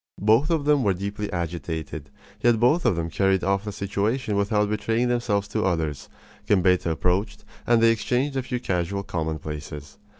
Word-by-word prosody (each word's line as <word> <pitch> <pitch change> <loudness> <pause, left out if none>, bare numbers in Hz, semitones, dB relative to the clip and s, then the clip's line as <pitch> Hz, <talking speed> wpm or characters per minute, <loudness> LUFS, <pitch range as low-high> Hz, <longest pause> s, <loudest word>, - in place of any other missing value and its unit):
Both 110 +8 +3
of 160 -4 0
them 150 -1 +4
were 100 -4 +2
deeply 100 +2 -4
agitated, 80 -3 -4 0.3
yet 120 -2 +3
both 140 +8 +3
of 110 - +3
them 85 0 -3
carried 95 -1 +2
off 100 +1 0
the 105 - -3
situation 105 +3 -1
without 105 +1 +1
betraying 115 +3 0
themselves 110 -5 0
to 110 - -1
others, 80 -6 -1 0.4
Gambetta 90 -3 +3
approached, 95 +6 -1 0.2
and 120 -1 +4
they 115 - +7
exchanged 125 +5 0
a 135 - +1
few 125 -1 -3
casual 95 -3 -2
commonplaces. 75 -4 -5
100 Hz, 165 wpm, -24 LUFS, 85-115 Hz, 0.4 s, they